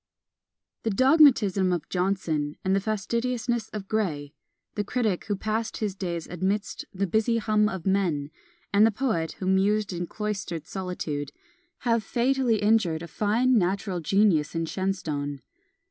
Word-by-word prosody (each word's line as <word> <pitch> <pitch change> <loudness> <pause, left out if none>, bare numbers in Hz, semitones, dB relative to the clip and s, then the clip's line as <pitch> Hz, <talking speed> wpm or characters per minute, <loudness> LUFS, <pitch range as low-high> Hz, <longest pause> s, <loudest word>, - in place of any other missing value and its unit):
The 225 - -1
dogmatism 225 - +5
of 175 -4 -2
Johnson, 175 -6 -1
and 190 +1 +3
the - - +3
fastidiousness 235 +3 -1
of 205 -2 -6
Gray, 155 -10 -2 0.4
the 205 - -1
critic 215 -4 -1
who 205 - -1
passed 220 +3 -2
his 210 -3 -2
days 175 -4 -4
amidst 190 +4 -2
"the 195 +1 -1
busy 220 +5 +1
hum 215 -1 +2
of 190 -5 -6
men," 175 -7 0 0.4
and 200 +1 +6
the 225 - +6
poet 215 - -1
who 185 - -7
mused 195 +2 +2
in 175 0 -3
cloistered 195 -7 -4
solitude, 160 -7 -4 0.5
have 230 -2 +1
fatally 240 -1 +1
injured 195 -7 +2
a - - -6
fine 225 +7 +2
natural 190 0 -1
genius 170 -3 +2
in 165 0 0
Shenstone. 155 -8 -3
195 Hz, 145 wpm, -26 LUFS, 175-220 Hz, 0.5 s, and